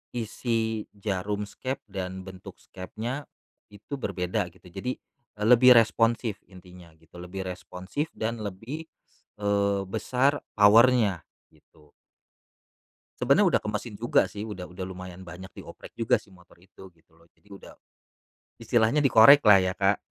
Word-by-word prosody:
isi 115 Hz, -1 st, -2 dB
jarum 100 Hz, 0 st, -3 dB
skep 130 Hz, +6 st, -6 dB
dan 95 Hz, -1 st, -5 dB
bentuk 95 Hz, -1 st, -11 dB
skepnya, 115 Hz, +9 st, -7 dB, 0.4 s
itu 105 Hz, +7 st, -9 dB
berbeda 90 Hz, -2 st, -2 dB
gitu, 90 Hz, +1 st, -19 dB
jadi, 125 Hz, +8 st, -4 dB, 0.4 s
lebih 125 Hz, +3 st, +6 dB
responsif 115 Hz, -1 st, +2 dB
intinya 90 Hz, -2 st, -15 dB
gitu, 80 Hz, +2 st, -16 dB
lebih 95 Hz, +2 st, -6 dB
responsif 95 Hz, -, -5 dB
dan 115 Hz, +1 st, -3 dB
lebih, 115 Hz, +11 st, -7 dB, 0.5 s
eee, 100 Hz, -1 st, 0 dB
besar 130 Hz, +8 st, 0 dB, 0.2 s
power-nya, 105 Hz, -2 st, +5 dB, 0.3 s
gitu. 75 Hz, -1 st, -25 dB, 1.3 s
Sebenarnya -, -, +4 dB
udah -, -, -9 dB
ke -, -, -2 dB
mesin 110 Hz, +2 st, -4 dB
juga 120 Hz, +4 st, +2 dB
sih, 105 Hz, +1 st, -7 dB
udah 95 Hz, -4 st, -8 dB
udah 90 Hz, +1 st, -7 dB
lumayan 90 Hz, 0 st, -9 dB
banyak 90 Hz, +2 st, -10 dB
di-oprek -, -, -11 dB
juga 115 Hz, -1 st, +1 dB
sih -, -, -22 dB
motor 90 Hz, -2 st, -20 dB
itu, 95 Hz, 0 st, -16 dB
gitu 80 Hz, 0 st, -30 dB
loh. 85 Hz, -, -23 dB
Jadi 105 Hz, -, -29 dB
udah 100 Hz, -1 st, -13 dB, 0.8 s
istilahnya 115 Hz, +5 st, +1 dB
dikorek 135 Hz, +3 st, +7 dB
lah 105 Hz, -3 st, +7 dB
ya 95 Hz, 0 st, -1 dB
Kak, 100 Hz, +1 st, +1 dB
100 Hz, 135 wpm, -26 LUFS, 95-115 Hz, 1.3 s, dikorek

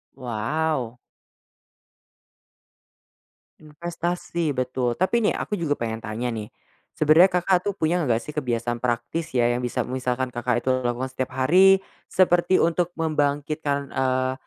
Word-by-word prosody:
Wow. 125 Hz, +1 st, -2 dB, 2.6 s
Investasi, 170 Hz, +1 st, -3 dB
betul, 125 Hz, -1 st, -1 dB
tapi 185 Hz, -, +1 dB
nih 225 Hz, -3 st, +2 dB
aku 210 Hz, -, -3 dB
juga 165 Hz, -5 st, 0 dB
pengen 115 Hz, -4 st, -3 dB
tanya 115 Hz, +2 st, -4 dB
nih, 110 Hz, -3 st, -4 dB, 0.5 s
sebenarnya 155 Hz, +3 st, +6 dB, 0.2 s
Kakak 180 Hz, 0 st, +2 dB
tuh 205 Hz, -, 0 dB
punya 170 Hz, -2 st, 0 dB
nggak 115 Hz, -3 st, +1 dB
sih -, -, -11 dB
kebiasaan 120 Hz, -5 st, -2 dB
praktis 120 Hz, +7 st, -3 dB
ya, 120 Hz, -2 st, +3 dB
yang 120 Hz, +1 st, -1 dB
bisa 120 Hz, -, -1 dB
misalkan 130 Hz, 0 st, -2 dB
Kakak 120 Hz, 0 st, -1 dB
itu 130 Hz, -, -2 dB, 0.2 s
lakukan 120 Hz, +2 st, -1 dB
setiap 130 Hz, 0 st, -4 dB
hari, 190 Hz, +7 st, +6 dB, 0.2 s
seperti 185 Hz, 0 st, +3 dB
untuk 175 Hz, +1 st, +1 dB
membangkitkan, 145 Hz, -2 st, -1 dB
eee, 130 Hz, 0 st, 0 dB
135 Hz, 130 wpm, -24 LUFS, 120-165 Hz, 2.6 s, sebenarnya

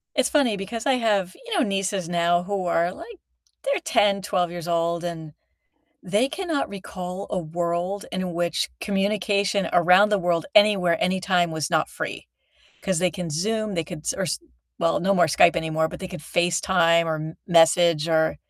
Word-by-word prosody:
it's -, -, +2 dB
funny 270 Hz, -9 st, +2 dB
because 215 Hz, +4 st, -6 dB
I 275 Hz, -, +3 dB
have, 210 Hz, -7 st, 0 dB
you 460 Hz, -6 st, -2 dB
know, 320 Hz, -, +3 dB
nieces 195 Hz, -3 st, -2 dB
now 175 Hz, 0 st, +1 dB
who 195 Hz, -1 st, -3 dB
are, 170 Hz, 0 st, +1 dB
like 460 Hz, -, -11 dB, 0.5 s
they're 280 Hz, +6 st, 0 dB
10, 200 Hz, -1 st, +2 dB
12 180 Hz, -3 st, -1 dB
years 175 Hz, -1 st, -7 dB
old, 170 Hz, 0 st, 0 dB
and 165 Hz, -3 st, -6 dB, 0.7 s
they 210 Hz, +8 st, +1 dB
cannot 330 Hz, -3 st, -2 dB
recall 185 Hz, -1 st, -7 dB
a 195 Hz, -, -1 dB
world 175 Hz, +4 st, -3 dB
in 185 Hz, -1 st, -3 dB
which 170 Hz, 0 st, -1 dB
communication 200 Hz, 0 st, 0 dB
around 180 Hz, +4 st, +5 dB
the 210 Hz, -, +2 dB
world 175 Hz, -2 st, 0 dB
anywhere, 195 Hz, -5 st, +4 dB
anytime 180 Hz, -2 st, +1 dB
was 160 Hz, -3 st, -3 dB
not -, -, +1 dB
free. -, -, -6 dB, 0.6 s
'Cause 190 Hz, -3 st, 0 dB
they 180 Hz, 0 st, +1 dB
can 170 Hz, 0 st, -6 dB
Zoom, 215 Hz, +6 st, -1 dB
they 165 Hz, -2 st, -1 dB
could 165 Hz, 0 st, -8 dB
s -, -, -2 dB
or 195 Hz, -, -2 dB
s -, -, -2 dB, 0.4 s
well, 165 Hz, -1 st, +1 dB
no 195 Hz, +2 st, +2 dB
more 180 Hz, -, +4 dB
Skype 160 Hz, +3 st, +4 dB
anymore, 160 Hz, 0 st, 0 dB
but -, -, -9 dB
they 190 Hz, -, -6 dB
could 180 Hz, -3 st, -8 dB
FaceTime 170 Hz, +1 st, +2 dB
or 160 Hz, -1 st, -1 dB
m 155 Hz, +1 st, -6 dB
message 170 Hz, -2 st, +4 dB
or 160 Hz, -1 st, +3 dB
and -, -, -8 dB
180 Hz, 185 wpm, -24 LUFS, 170-200 Hz, 0.7 s, around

